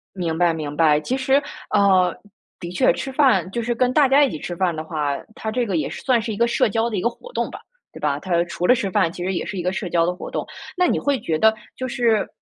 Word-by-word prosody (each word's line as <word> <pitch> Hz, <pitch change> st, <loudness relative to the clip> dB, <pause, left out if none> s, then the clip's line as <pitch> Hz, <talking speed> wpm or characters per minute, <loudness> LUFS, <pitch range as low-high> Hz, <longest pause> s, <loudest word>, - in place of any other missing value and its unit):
明 170 Hz, -4 st, -2 dB
白 175 Hz, -1 st, +3 dB
明 150 Hz, -2 st, -5 dB
白。 150 Hz, -2 st, +4 dB
其 250 Hz, +12 st, -2 dB
实 270 Hz, +1 st, +2 dB, 0.3 s
呃， 190 Hz, -4 st, +4 dB, 0.5 s
的 170 Hz, -, -6 dB
确， 180 Hz, -, +3 dB
吃 265 Hz, +9 st, -5 dB
饭 260 Hz, -9 st, +3 dB
就 235 Hz, +4 st, -3 dB
是 240 Hz, +1 st, -1 dB
跟 250 Hz, +1 st, +1 dB
大 285 Hz, 0 st, +4 dB
家 280 Hz, +2 st, +5 dB
一 270 Hz, -, 0 dB
起 -, -, -5 dB
吃 175 Hz, -, -5 dB
饭 175 Hz, -1 st, 0 dB
的 155 Hz, -, -5 dB
话， 150 Hz, -3 st, -2 dB, 0.2 s
它 220 Hz, -, -4 dB
这 245 Hz, +2 st, 0 dB
个 195 Hz, -4 st, -1 dB
也 155 Hz, -, -1 dB
是 -, -, -8 dB
算 255 Hz, -3 st, +2 dB
是 220 Hz, 0 st, -4 dB
一 205 Hz, -, -5 dB
个 235 Hz, -, +3 dB
社 235 Hz, -, +2 dB
交 225 Hz, +2 st, 0 dB
的 215 Hz, -, -3 dB
一 -, -, 0 dB
个 -, -, +3 dB
活 480 Hz, -, -12 dB
动 -, -, -2 dB
吧， -, -, -9 dB, 0.3 s
对 -, -, -11 dB
吧？ 145 Hz, -1 st, 0 dB
它 170 Hz, +1 st, 0 dB
除 175 Hz, 0 st, -3 dB
了 250 Hz, -, +6 dB
吃 210 Hz, -6 st, -2 dB
饭 185 Hz, -4 st, +2 dB
其 175 Hz, -, -6 dB
实 190 Hz, -, -1 dB
也 -, -, -2 dB
是 190 Hz, +3 st, -5 dB
一 180 Hz, -, -2 dB
个 180 Hz, -, -1 dB
社 195 Hz, -2 st, -4 dB
交 170 Hz, -1 st, +2 dB
的 180 Hz, -, -1 dB
活 180 Hz, -, -8 dB
动。 -, -, -3 dB, 0.3 s
那 360 Hz, 0 st, +3 dB
你 -, -, +1 dB
会 285 Hz, -2 st, 0 dB
觉 160 Hz, -5 st, -1 dB
得 220 Hz, +5 st, +4 dB, 0.2 s
就 255 Hz, -, -4 dB
是 235 Hz, -3 st, +1 dB
195 Hz, 310 characters per minute, -22 LUFS, 170-240 Hz, 0.5 s, 了